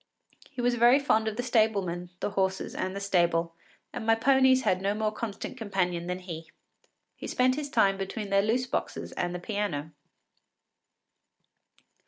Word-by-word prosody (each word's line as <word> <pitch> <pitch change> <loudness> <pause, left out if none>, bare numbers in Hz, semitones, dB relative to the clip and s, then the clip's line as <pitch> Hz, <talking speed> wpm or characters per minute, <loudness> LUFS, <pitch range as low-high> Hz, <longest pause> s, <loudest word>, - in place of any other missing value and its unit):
He 245 - -6
was 245 0 +2
very 240 +2 +6
fond 220 -6 +2
of 220 - -2
the 245 - -1
stablemen, 200 -7 +1
the - - -1
horses, 190 -1 -1
and 185 +1 -3
the - - -3
stable, 170 -4 +1 0.4
and 245 - -5
my 225 0 +4
ponies 260 +2 +4
had 185 -4 +1
no 200 +2 0
more 215 0 0
constant 215 +2 -6
companion 180 -5 -1
than 180 0 -2
he. 170 -3 -8 0.7
He - - -7
spent 255 0 +2
his 290 +1 -4
time 195 -6 +3
between 200 +1 -4
their 195 0 +4
loose 230 +5 +1
boxes - - -4
and 175 0 -3
the - - -4
piano. 175 -6 -3
205 Hz, 165 wpm, -28 LUFS, 180-235 Hz, 0.7 s, very